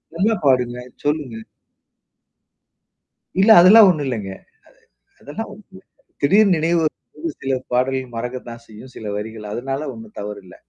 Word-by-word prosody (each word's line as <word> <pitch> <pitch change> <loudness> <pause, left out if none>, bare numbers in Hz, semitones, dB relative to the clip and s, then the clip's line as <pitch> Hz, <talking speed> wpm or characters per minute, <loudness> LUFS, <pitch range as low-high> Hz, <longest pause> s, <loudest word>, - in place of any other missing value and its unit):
நல்லா 205 +7 +2
பாடுங்க 125 -3 +2 0.3
சொல்லுங்க? 145 -6 -2 2.0
இல்ல, 205 - +4
அதெல்லாம் 205 +4 +8
ஒண்ணும் 155 -5 0
இல்லேங்க. 105 -7 -4 0.7
அ - - -40
அதெல்லாம் 220 +11 -7
ஒண்ணும் 215 - -15
இல்ல. 190 - -13 0.4
திடீர் 195 +7 +4
நினைவு. 165 +1 +1 0.3
அது 165 +2 -3
சில 135 0 0 0.2
பாடல் 130 0 -1
மறக்கத்தான் 120 0 -6
செய்யும். 110 +4 -13
சில 110 - -8
வரிகள், 105 0 -7
அதனால 135 +6 -4
ஒண்ணும் 225 -1 -13
தவறு 105 0 -6
இல்ல. 90 - -14
135 Hz, 135 wpm, -20 LUFS, 115-170 Hz, 2.0 s, அதெல்லாம்